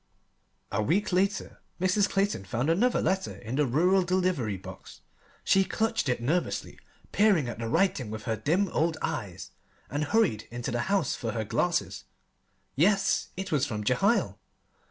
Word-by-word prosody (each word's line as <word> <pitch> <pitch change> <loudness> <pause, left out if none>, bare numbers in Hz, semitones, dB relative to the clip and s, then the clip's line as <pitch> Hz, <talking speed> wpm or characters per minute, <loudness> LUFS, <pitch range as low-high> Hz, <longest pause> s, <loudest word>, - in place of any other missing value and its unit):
A - - 0
week 180 - 0
later 195 +2 0 0.2
Mrs. 185 +2 +2
Clayton 195 - 0
found 120 +10 0
another 235 +9 +2
letter 190 0 -1
in 115 +4 -6
the 150 -2 +2
rural 180 +9 +3
delivery 180 - 0
box. 95 - -11 0.4
She 195 - +4
clutched 225 - -1
it 125 - 0
nervously, 155 +9 -2 0.3
peered 200 -8 +3
at 120 - -6
the 115 - -3
writing 160 - +1
with 110 0 -6
her 110 +1 -1
dim 175 - +1
old 160 0 0
eyes, 95 - -4 0.4
and 145 +2 -1
hurried 160 - +1
into 120 0 -4
the 120 - -1
house 195 -8 +1
for 115 -2 -4
her 110 -2 -2
glasses. 105 - -1 0.7
Yes, 195 +7 +2
it 190 -1 -4
was 145 -2 +2
from 105 -5 -4
Jehiel. 195 - +1
160 Hz, 155 wpm, -28 LUFS, 120-195 Hz, 0.7 s, She